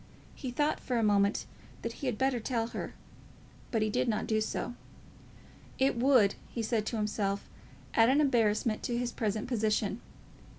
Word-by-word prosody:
He 260 Hz, -, -5 dB
thought 295 Hz, +5 st, +1 dB
for 250 Hz, -, -2 dB
a 230 Hz, -, +2 dB
moment 200 Hz, 0 st, +3 dB, 0.4 s
that 230 Hz, -, -2 dB
he 275 Hz, -, -2 dB
had 245 Hz, -4 st, -1 dB
better 265 Hz, -1 st, +1 dB
tell 230 Hz, 0 st, -1 dB
her, -, -, -5 dB, 0.7 s
but 225 Hz, -2 st, +1 dB
he 215 Hz, -, +1 dB
did -, -, +1 dB
not 215 Hz, -2 st, 0 dB
do 215 Hz, -1 st, +1 dB
so. 230 Hz, +2 st, -2 dB, 1.0 s
It 265 Hz, 0 st, +3 dB
would, 235 Hz, -5 st, +5 dB, 0.2 s
he 230 Hz, -, -3 dB
said 220 Hz, -1 st, 0 dB
to 230 Hz, -, -2 dB
himself, 205 Hz, -2 st, -1 dB, 0.5 s
add 225 Hz, +1 st, +5 dB
an 275 Hz, +3 st, +4 dB
embarrassment 230 Hz, -5 st, +2 dB
to 240 Hz, -, -1 dB
his 245 Hz, 0 st, -1 dB
present 215 Hz, 0 st, -2 dB
position. 215 Hz, -2 st, 0 dB
230 Hz, 170 wpm, -31 LUFS, 215-250 Hz, 1.0 s, would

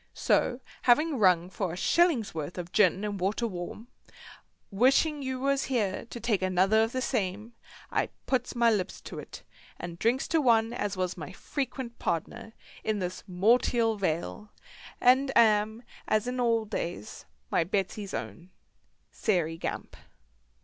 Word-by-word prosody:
So 245 Hz, +1 st, +1 dB, 0.2 s
having 290 Hz, +3 st, +3 dB
rung 180 Hz, -4 st, +4 dB
for 180 Hz, -2 st, -3 dB
a -, -, -6 dB
shilling's 315 Hz, -, +2 dB
worth 160 Hz, +2 st, -5 dB
of 180 Hz, 0 st, -6 dB
gin 195 Hz, -1 st, +3 dB
and 205 Hz, -2 st, -3 dB
water 200 Hz, +6 st, 0 dB
warm, 190 Hz, +2 st, -6 dB, 0.2 s
and 195 Hz, -, -16 dB
wishing 285 Hz, +4 st, +4 dB
you 260 Hz, -1 st, -3 dB
was 275 Hz, +1 st, +1 dB
here 225 Hz, -5 st, -1 dB
to 235 Hz, -, -7 dB
take 225 Hz, -4 st, 0 dB
another 185 Hz, +4 st, +3 dB
of 225 Hz, +1 st, +1 dB
the 255 Hz, 0 st, -2 dB
same, 215 Hz, -1 st, -2 dB, 0.4 s
I -, -, 0 dB, 0.2 s
puts 250 Hz, -2 st, -1 dB
my 235 Hz, -1 st, +4 dB
lips 195 Hz, -3 st, -2 dB
to 160 Hz, -, -8 dB
it, 150 Hz, -, -10 dB, 0.3 s
and 170 Hz, -1 st, -7 dB
drinks 240 Hz, +4 st, +1 dB
to 325 Hz, -1 st, +3 dB
one 230 Hz, -3 st, +3 dB
as 205 Hz, -5 st, -3 dB
was 185 Hz, 0 st, -2 dB
my 155 Hz, -4 st, -7 dB
frequent 265 Hz, -4 st, -5 dB
pardner 220 Hz, +7 st, -3 dB, 0.3 s
in 215 Hz, -1 st, 0 dB
this 185 Hz, -1 st, -4 dB
mortial 225 Hz, +4 st, +3 dB
vale, 190 Hz, +2 st, -3 dB, 0.5 s
and 265 Hz, +2 st, +4 dB
am, 220 Hz, 0 st, +3 dB, 0.2 s
as 215 Hz, +2 st, +1 dB
in 250 Hz, 0 st, -2 dB
old 230 Hz, -3 st, +1 dB
days, 170 Hz, -, -5 dB, 0.3 s
my -, -, +3 dB
Betsy's 195 Hz, +2 st, -2 dB
own 110 Hz, -, -7 dB, 0.6 s
SAIREY 165 Hz, -6 st, 0 dB
GAMP. -, -, -5 dB
215 Hz, 155 wpm, -28 LUFS, 185-245 Hz, 0.6 s, rung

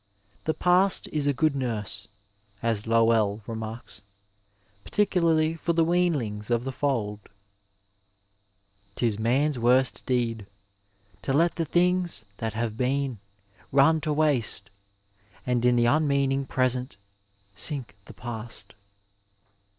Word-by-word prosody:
The 160 Hz, -, 0 dB
past 180 Hz, +2 st, +3 dB
is 150 Hz, -2 st, +1 dB
a -, -, +4 dB
good 150 Hz, +1 st, +1 dB
nurse, 110 Hz, -6 st, -3 dB, 0.6 s
as 115 Hz, -2 st, -1 dB
Lowell 115 Hz, -2 st, +3 dB
remarks, 110 Hz, -1 st, -7 dB, 0.8 s
particularly 165 Hz, -6 st, +2 dB
for 165 Hz, +1 st, -1 dB
the 165 Hz, 0 st, +3 dB
weanlings 145 Hz, -12 st, 0 dB
of 120 Hz, 0 st, +1 dB
the 135 Hz, -, -3 dB
fold. 120 Hz, -7 st, -1 dB, 1.8 s
'Tis 110 Hz, -4 st, 0 dB
man's 130 Hz, +5 st, +1 dB
worst 125 Hz, +2 st, +3 dB
deed 115 Hz, -5 st, -1 dB, 0.7 s
To 135 Hz, -, -2 dB
let 165 Hz, +4 st, +3 dB
the 165 Hz, -, 0 dB
things 175 Hz, -5 st, +1 dB
that 110 Hz, -2 st, -3 dB
have 115 Hz, -1 st, -2 dB
been, 130 Hz, -1 st, -1 dB, 0.5 s
run 145 Hz, +4 st, +4 dB
to 155 Hz, 0 st, -1 dB
waste 145 Hz, -10 st, 0 dB, 0.7 s
And 125 Hz, -1 st, 0 dB
in 125 Hz, 0 st, +4 dB
the 120 Hz, -1 st, +3 dB
unmeaning 140 Hz, -1 st, +2 dB
Present 130 Hz, -2 st, 0 dB, 0.6 s
sink 125 Hz, -1 st, -3 dB
the -, -, -12 dB
Past. 120 Hz, -2 st, -5 dB
130 Hz, 115 wpm, -26 LUFS, 115-155 Hz, 1.8 s, a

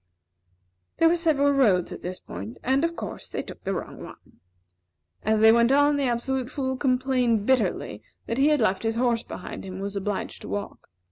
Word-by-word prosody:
There 330 Hz, -, +5 dB
were 335 Hz, -, +4 dB
several 305 Hz, -4 st, +2 dB
roads 215 Hz, -11 st, +3 dB
at -, -, -7 dB
this 180 Hz, +1 st, -5 dB
point 100 Hz, +6 st, -8 dB
and, 265 Hz, +4 st, +2 dB
of 335 Hz, 0 st, 0 dB
course, -, -, -7 dB
they -, -, -4 dB
took -, -, -11 dB
the 195 Hz, 0 st, -2 dB
wrong -, -, -6 dB
one. -, -, -14 dB, 0.8 s
As 215 Hz, 0 st, +1 dB
they 220 Hz, 0 st, +8 dB
went 235 Hz, +2 st, +4 dB
on, 290 Hz, +1 st, +4 dB
the 285 Hz, -1 st, 0 dB
Absolute 250 Hz, +1 st, -1 dB
Fool 260 Hz, -2 st, -2 dB
complained 255 Hz, -4 st, +1 dB
bitterly 215 Hz, -, 0 dB, 0.2 s
that 230 Hz, +3 st, -2 dB
he 280 Hz, -, +5 dB
had 300 Hz, -3 st, +3 dB
left 190 Hz, -3 st, +1 dB
his 225 Hz, 0 st, -1 dB
horse 235 Hz, -1 st, +1 dB
behind 185 Hz, -, -8 dB
him, 190 Hz, -, -7 dB
and 190 Hz, -, -5 dB
was 200 Hz, 0 st, -4 dB
obliged 200 Hz, 0 st, -3 dB
to -, -, -8 dB
walk. 205 Hz, 0 st, -5 dB
240 Hz, 200 wpm, -25 LUFS, 205-275 Hz, 0.8 s, they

